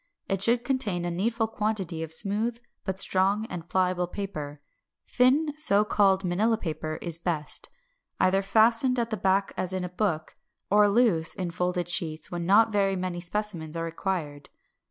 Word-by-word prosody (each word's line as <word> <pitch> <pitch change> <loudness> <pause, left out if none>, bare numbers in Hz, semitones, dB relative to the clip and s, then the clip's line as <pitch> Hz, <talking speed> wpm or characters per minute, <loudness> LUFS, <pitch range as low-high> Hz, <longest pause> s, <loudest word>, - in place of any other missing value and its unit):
It 195 -1 -1
should 235 +3 +2
contain 215 -10 -1
a 175 - -2
needful 225 +6 0
quantity 210 -6 -2
of 160 -1 -5
smooth 210 +7 -1 0.3
but 190 -1 -3
strong 195 +3 +2
and 170 -1 -7
pliable 180 -1 +1
paper 155 -7 -6 0.5
(thin 280 +5 +2
so 210 -8 +3
called 195 -2 +3
Manilla 215 +6 +1
paper 155 -3 -4
is 170 -1 -1
best), 165 -4 -2 0.5
either 185 +1 +3
fastened 230 +5 +3
at 235 -1 -1
the - - +1
back 195 0 +1
as 185 0 -2
in 185 -1 -2
a 180 - -4
book, 175 -4 -2 0.4
or 205 0 +5
loose 200 -8 +2
in 180 -2 -3
folded 180 0 -1
sheets 160 -3 -1
when 175 -1 -3
not 220 +3 +5
very 195 -2 +1
many 180 -1 -3
specimens 175 -3 -3
are 165 - -2
required. 165 -4 -4
190 Hz, 165 wpm, -27 LUFS, 175-215 Hz, 0.5 s, or